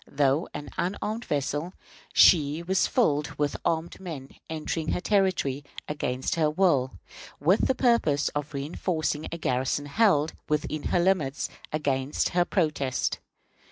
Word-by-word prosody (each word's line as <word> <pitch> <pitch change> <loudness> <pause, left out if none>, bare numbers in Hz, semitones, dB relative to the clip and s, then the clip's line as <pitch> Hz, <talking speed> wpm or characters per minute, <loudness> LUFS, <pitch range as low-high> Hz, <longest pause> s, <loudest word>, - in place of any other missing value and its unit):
Though 140 +2 +1
an 145 - -6
unarmed 210 +5 -2
vessel, 145 +4 -2 0.4
she 155 -1 +5
was 190 +2 +2
filled 150 - +1
with 145 -1 0
armed 165 +1 -1
men 155 -8 -7 0.2
entering 160 0 -2
her - - 0
territory 185 -9 +1 0.2
against 130 -4 -2
her 155 -2 +3
will, 150 -6 +2 0.5
with 175 +9 +3
the 265 - +2
purpose 195 - +2
of 145 0 -4
reënforcing 155 +2 -2
a 170 - -4
garrison 130 -1 -1
held, 160 -2 +3 0.2
within 150 0 -1
her 180 - +2
limits, 170 -6 +1 0.2
against 140 -2 0
her 175 0 +2
protest. 150 -8 0
155 Hz, 130 wpm, -27 LUFS, 145-180 Hz, 0.5 s, she